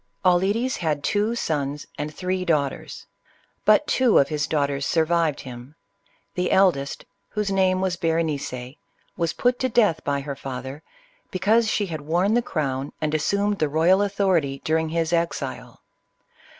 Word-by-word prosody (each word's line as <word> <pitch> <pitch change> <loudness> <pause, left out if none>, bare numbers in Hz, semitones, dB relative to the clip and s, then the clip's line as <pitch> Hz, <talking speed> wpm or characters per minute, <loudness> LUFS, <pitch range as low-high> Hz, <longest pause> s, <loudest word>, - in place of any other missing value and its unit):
Auletes 200 +8 +2
had 150 -4 -1
two 210 +3 +1
sons 145 -8 -2
and 150 +1 -4
three 185 +3 -2
daughters. 150 -6 -2 0.6
But 215 +8 +5
two 255 -6 +3
of 140 - +4
his 150 -1 -1
daughters 140 -2 0
survived 165 -1 +1
him: 125 +3 -10 0.6
the 180 0 -1
eldest, 160 -8 +2 0.2
whose 210 -2 -2
name 185 -1 +2
was 185 -2 -1
Berenice, 150 -7 -2 0.4
was 165 -2 -1
put 245 0 +1
to 260 - 0
death 215 -8 +2
by 140 -1 -1
her 140 0 -5
father, 135 +1 -7 0.5
because 220 +5 +2
she 210 - 0
had 160 -5 -5
worn 175 +7 +1
the 240 - +3
crown, 140 - -3
and 155 0 -1
assumed 200 +6 0
the 155 - +1
royal 165 +6 +4
authority, 190 -9 +1
during 160 0 +1
his 165 0 -1
exile. 170 0 -3
165 Hz, 150 wpm, -24 LUFS, 145-195 Hz, 0.6 s, But